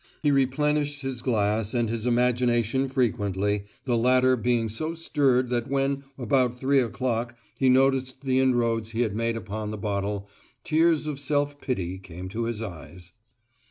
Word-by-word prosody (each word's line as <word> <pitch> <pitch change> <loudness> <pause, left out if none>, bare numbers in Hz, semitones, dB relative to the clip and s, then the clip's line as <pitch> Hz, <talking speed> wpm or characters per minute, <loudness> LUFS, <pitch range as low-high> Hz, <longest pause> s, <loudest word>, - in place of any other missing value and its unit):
He 145 - +4
replenished 145 +2 +1
his 135 -3 -4
glass 110 -2 0
and 120 -1 +1
his 115 +1 -3
imagination 125 +1 +2
frequently, 105 -5 0 0.2
the 125 -3 +1
latter 130 +2 +4
being 120 -1 +1
so 155 +10 -3
stirred 135 -6 +1
that 120 -1 0
when, 140 0 0
about 125 0 +1
three 135 +1 +3
o'clock, 120 -1 -2 0.2
he 130 - +4
noticed 130 0 +2
the 130 -1 +2
inroads 115 -4 +1
he 115 - 0
had 110 -4 0
made 115 0 -1
upon 110 -1 -5
the 110 - -4
bottle, 100 -1 -2 0.4
tears 160 0 +2
of 150 -3 -4
self 145 0 -1
pity 95 -8 -3
came 90 0 -9
to 115 +4 -3
his 115 -1 -3
eyes. 85 -2 -9
120 Hz, 160 wpm, -26 LUFS, 110-135 Hz, 0.4 s, He